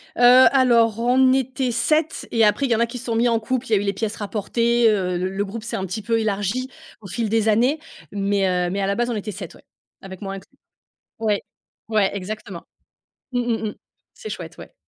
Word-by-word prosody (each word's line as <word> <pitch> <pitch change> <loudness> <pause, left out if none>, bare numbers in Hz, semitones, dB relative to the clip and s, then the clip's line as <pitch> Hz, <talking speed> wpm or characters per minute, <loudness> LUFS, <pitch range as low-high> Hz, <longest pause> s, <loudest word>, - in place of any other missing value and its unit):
Heu, - - -3 0.3
alors, 235 -5 +3
on 255 +2 +4
était 260 -1 0
7, 305 +7 0
et 230 -1 +3
après, 240 +7 +2
il 250 - -2
y - - +5
en 220 - -1
a 235 - +4
qui 250 - -7
se 245 - -8
sont 230 -2 -1
mis 235 +2 +3
en 230 -1 +2
couple, 255 +3 -2
il - - -11
y - - +4
a - - +6
eu 195 - 0
les 200 - 0
pièces 215 +2 -3
rapportées, 230 +3 +1
heu, 180 -4 0
le 185 +1 -1
le 205 - 0
groupe 215 +3 -7
s'est 225 - -4
un 190 - -2
petit 200 +4 -4
peu 230 +2 0
élargi 215 +4 -1 0.3
au 195 - -10
fil 210 +4 -2
des 225 0 +1
années. 245 +8 +2 0.3
Mais, 200 -1 0 0.2
heu - - -2
mais 200 +1 -2
à 195 - 0
la 200 - 0
base, 240 0 0
on 235 - -1
était 210 0 -4
7, 195 0 -8
ouais, - - -19 0.4
avec 190 -1 -10
moi 195 -1 -5
inclus. 195 +8 -11 0.6
Ouais, 215 -2 0 0.5
ouais 215 -3 +2
exactement. 195 -2 -6 0.7
Mmh, 245 - +1
mmh, 235 -2 -1
mmh. - - -7 0.4
C'est 440 -3 -8
chouette, - - -7
ouais. - - -12
225 Hz, 240 wpm, -22 LUFS, 200-240 Hz, 0.7 s, a